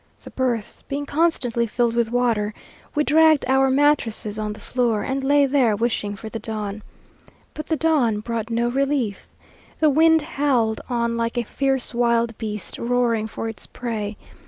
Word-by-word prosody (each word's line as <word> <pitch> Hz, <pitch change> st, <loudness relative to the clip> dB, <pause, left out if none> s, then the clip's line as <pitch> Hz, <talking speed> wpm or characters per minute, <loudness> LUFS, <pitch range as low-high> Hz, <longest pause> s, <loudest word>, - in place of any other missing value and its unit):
The -, -, -11 dB
berths 245 Hz, -5 st, -2 dB
being 285 Hz, +1 st, -4 dB
constantly 275 Hz, -7 st, +1 dB
filled 235 Hz, +1 st, 0 dB
with 235 Hz, -1 st, +1 dB
water, 230 Hz, -4 st, 0 dB, 0.4 s
we 300 Hz, -, +3 dB
dragged 315 Hz, -1 st, +4 dB
our 265 Hz, 0 st, +3 dB
mattresses 260 Hz, -7 st, +1 dB
on 210 Hz, -1 st, -2 dB
the 215 Hz, -, -12 dB
floor, 240 Hz, -4 st, 0 dB
and 270 Hz, 0 st, -2 dB
lay 285 Hz, +1 st, +4 dB
there 260 Hz, -6 st, +2 dB
wishing 210 Hz, -2 st, -1 dB
for 220 Hz, -, -9 dB
the 225 Hz, +1 st, -5 dB
dawn. 215 Hz, -2 st, -5 dB, 0.7 s
But 305 Hz, -, -7 dB
the 320 Hz, -, +1 dB
dawn 270 Hz, -9 st, +2 dB
brought 230 Hz, 0 st, -4 dB
no 235 Hz, +1 st, 0 dB
relief. 265 Hz, -4 st, -1 dB, 0.5 s
The 310 Hz, -2 st, +4 dB
wind 320 Hz, +1 st, +4 dB
howled 260 Hz, -8 st, 0 dB
on 235 Hz, -1 st, 0 dB
like 230 Hz, +1 st, -2 dB
a 240 Hz, -, +1 dB
fierce 270 Hz, +2 st, -1 dB
wild 235 Hz, -1 st, +1 dB
beast 210 Hz, -4 st, -5 dB
roaring 235 Hz, -2 st, +1 dB
for 225 Hz, -, -5 dB
its 225 Hz, -, -8 dB
prey. 215 Hz, -4 st, -4 dB
240 Hz, 165 wpm, -22 LUFS, 220-275 Hz, 0.7 s, dragged